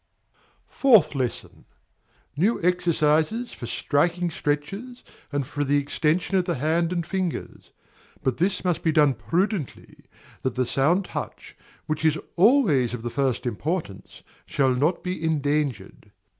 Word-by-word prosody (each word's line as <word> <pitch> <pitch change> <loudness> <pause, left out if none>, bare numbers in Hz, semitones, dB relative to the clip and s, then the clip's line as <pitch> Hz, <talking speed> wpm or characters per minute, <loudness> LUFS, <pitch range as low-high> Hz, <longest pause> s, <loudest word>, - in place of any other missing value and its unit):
Fourth 220 - +4
Lesson. 130 -4 -4 0.7
New 195 +10 +2
exercises 175 +5 +1
for 120 - -7
striking 170 +7 0
stretches, 195 +13 -3 0.3
and 145 -2 -1
for 145 +3 -3
the 145 +1 +2
extension 160 +6 0
of 180 - +1
the 175 -2 -1
hand 160 +5 0
and 170 -2 -1
fingers; 185 -1 -4 0.5
but 130 -2 0
this 185 +3 0
must 180 -2 0
be 160 - +2
done 150 -3 +4
prudently, 165 - -3 0.4
that 130 - -2
the 130 0 +1
sound 160 +10 +2
touch, - - -7 0.3
which 155 0 -3
is 160 -1 +3 0.2
always 175 - +4
of 115 - -9
the 120 - -3
first 135 -2 -1
importance, 125 - -4 0.2
shall 135 -2 +2
not 150 +8 0
be 180 -2 -4
endangered. 145 -8 -1
155 Hz, 135 wpm, -24 LUFS, 140-180 Hz, 0.7 s, Fourth